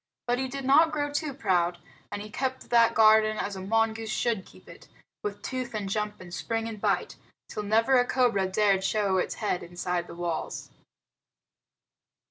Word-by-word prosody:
But 245 +1 0
he 265 - -1
did 275 +1 -6
not 310 +5 +5
grow 290 -1 -1
too 290 +1 -2
proud, 180 -9 +1 0.3
and 205 - -4
he 210 - -10
kept 260 +2 -3
that 235 -1 +5
garden 215 0 +5
as 200 -1 -3
a 190 - -6
mongoose 225 +2 0
should 225 -3 -1
keep - - -18
it, - - -14 0.3
with 205 -1 -5
tooth 255 -3 -4
and 205 -2 -3
jump 210 +1 -2
and 175 -2 -11
spring 225 +3 -2
and 215 -3 -7
bite, - - 0 0.3
till - - -5
never 225 +5 +3
a 245 - +3
cobra 235 -7 +2
dared 195 0 +2
show 195 -2 +1
its - - -2
head 210 -4 -1
inside 175 0 -3
the - - -9
walls. 170 -1 -4
215 Hz, 180 wpm, -27 LUFS, 195-245 Hz, 0.3 s, not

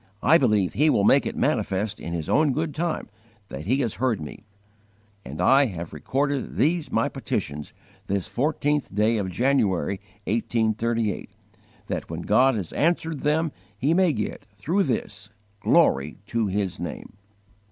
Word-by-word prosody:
_ - - -35 0.2
I 165 - +6
believe 105 -8 +2
He 150 +4 +3
will 105 - +3
make - - +4
it - - -4
manifest 100 +2 0
in 85 - -6
His 85 -2 -3
own 150 -3 +3
good 155 +2 -2
time 170 0 -2 0.4
that 70 +4 -7
He 130 +5 +2
has 115 -5 -1
heard 125 -5 +1
me; 75 +7 -9 0.8
and 75 +4 -8
I 135 +9 +5
have 85 -5 -7
recorded 140 0 -2
these 160 +4 +1
my - - +2
petitions 75 +1 -4 0.4
this 100 -2 -1
fourteenth 145 -2 -1
day 110 +2 +3
of 95 -2 -2
January, 100 - +1 0.2
1838, 115 0 0 0.6
that - - -4
when - - -4
God 130 0 +4
has 95 -6 -4
answered 165 -1 0
them 155 +2 +1 0.3
He 140 +9 +2
may 180 -1 +4
get, 105 -7 -4
through 145 - -1
this, 105 -5 -3 0.3
glory 70 +3 +3
to 115 0 -1
His 95 -1 -2
name." 85 -3 -6
115 Hz, 155 wpm, -25 LUFS, 100-145 Hz, 0.8 s, I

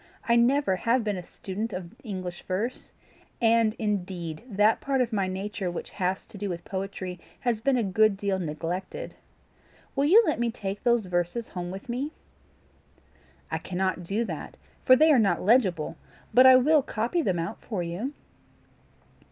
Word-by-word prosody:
I 235 - +4
never 235 -4 +3
have 235 +4 +1
been 210 -2 -1
a - - -4
student 200 +5 -5
of 180 -1 -6
English 185 -6 -5
verse, 215 +7 -3 0.5
and 230 -1 +3
indeed 180 -6 -3
that 210 +1 +3
part 275 -1 0
of 245 -2 0
my 195 -3 +1
nature 190 0 -3
which 175 - -6
has 185 -1 -2
to 215 -4 -12
do 205 0 -2
with 170 -1 -5
poetry, 190 -2 -5 0.2
has 235 -3 0
been 270 +1 +2
a 235 - +1
good 205 +1 +3
deal 195 -1 -1
neglected. 170 +3 -4 0.8
Will 275 0 +2
you 410 +10 +7
let 310 - 0
me 235 0 +1
take 200 -3 -5
those 235 -3 +2
verses 180 +6 -2
home 175 -1 -5
with 190 +2 -8
me?" 265 +6 -3 1.4
"I - - -1
cannot 185 0 -2
do 200 +7 -1
that, 165 -8 -7 0.3
for 255 - +7
they 310 +4 +5
are 275 - +6
not 205 -3 +2
legible; 190 -8 +2 0.4
but 255 +1 +8
I 260 - +9
will 295 +4 +5
copy 240 +7 -1
them 190 - 0
out 165 0 -4
for 200 -6 -3
you." 180 +11 -3
205 Hz, 170 wpm, -27 LUFS, 185-240 Hz, 1.4 s, I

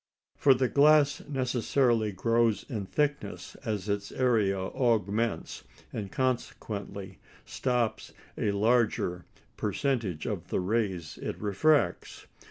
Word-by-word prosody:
For 135 -2 +5
the 130 0 +1
glass 145 +1 +4
necessarily 125 -4 +1
grows 115 +3 +1
in 105 -8 -5
thickness 145 +5 -2
as 105 -3 -3
its 100 -1 -2
area 110 -7 +2
augments, 110 - -1 0.3
and 100 -3 -5
consequently 100 -6 -3 0.3
stops 125 -3 -1 0.2
a - - 0
larger 105 -4 +1 0.3
percentage 115 - -1
of - - -4
the - - -1
rays 95 -4 -2
it - - -4
refracts. 115 +8 +1
115 Hz, 105 wpm, -29 LUFS, 100-130 Hz, 0.3 s, For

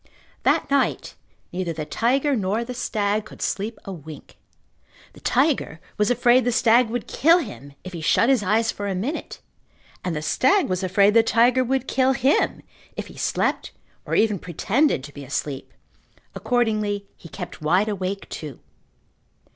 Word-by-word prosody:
That - - +2
night 280 -1 0 0.4
neither 175 -2 -3
the 155 -1 -5
tiger 270 - +1
nor 210 +1 -1
the 250 +1 -6
stag 210 -3 -1
could 215 - -14
sleep 215 +3 -3
a 195 - -6
wink. 155 -3 -12 0.7
The - - -15
tiger 260 - +1 0.2
was 210 0 +1
afraid 245 +1 +4
the 245 - +1
stag 235 +1 +4
would 240 0 -3
kill 330 +5 +4
him 140 - -7
if 185 - -9
he 170 - -6
shut 230 - +3
his 265 -4 +3
eyes 220 +3 +1
for 205 - -5
a 195 - -2
minute, 245 - -4 0.6
and 175 -3 -2
the 150 - -4
stag 345 - +2
was 185 0 -1
afraid 195 +2 +3
the 230 - +7
tiger 235 +3 +3
would 265 +1 -1
kill 265 0 +2
him 265 +3 +1 0.3
if - - -5
he - - -13
slept - - -1 0.3
or - - -3
even 210 -3 +2
pretended 195 - 0
to 145 0 -10
be 145 - -9
asleep. 135 +1 -4 0.6
Accordingly 215 -4 0
he 165 - -14
kept - - -8
wide 180 +7 +2
awake 195 -1 -3
too. 150 -5 -7
215 Hz, 165 wpm, -23 LUFS, 185-245 Hz, 0.7 s, the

